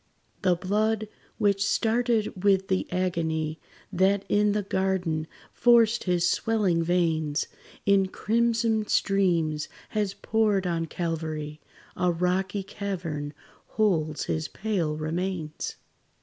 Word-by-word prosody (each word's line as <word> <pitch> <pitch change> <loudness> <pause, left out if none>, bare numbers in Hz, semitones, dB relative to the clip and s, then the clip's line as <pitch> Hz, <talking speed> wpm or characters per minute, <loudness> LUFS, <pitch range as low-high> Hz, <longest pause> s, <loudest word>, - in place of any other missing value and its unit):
The 185 -3 +3
blood, 215 +4 0 0.3
which 200 -1 +2
started 225 -3 +1
with 195 -1 +3
the 190 -1 0
agony 160 -3 -1 0.3
That 190 +2 +2
in 205 0 +3
the 210 0 0
garden 190 -5 -1 0.3
forced 235 -1 +4
his 175 -2 +2
swelling 200 -7 +1
veins, 160 -3 +1 0.4
In 195 -1 +4
crimson 225 +1 +1
streams 170 -6 +1 0.2
has 205 -3 -1
poured 210 -2 +1
on 165 -2 -1
Calvary; 155 -2 -4 0.3
A 180 0 +2
rocky 185 +3 0
cavern 170 -7 -4 0.3
holds 160 -8 +1
his 155 0 -2
pale 180 -8 -2
remains. 160 0 -3
185 Hz, 105 wpm, -27 LUFS, 165-205 Hz, 0.4 s, forced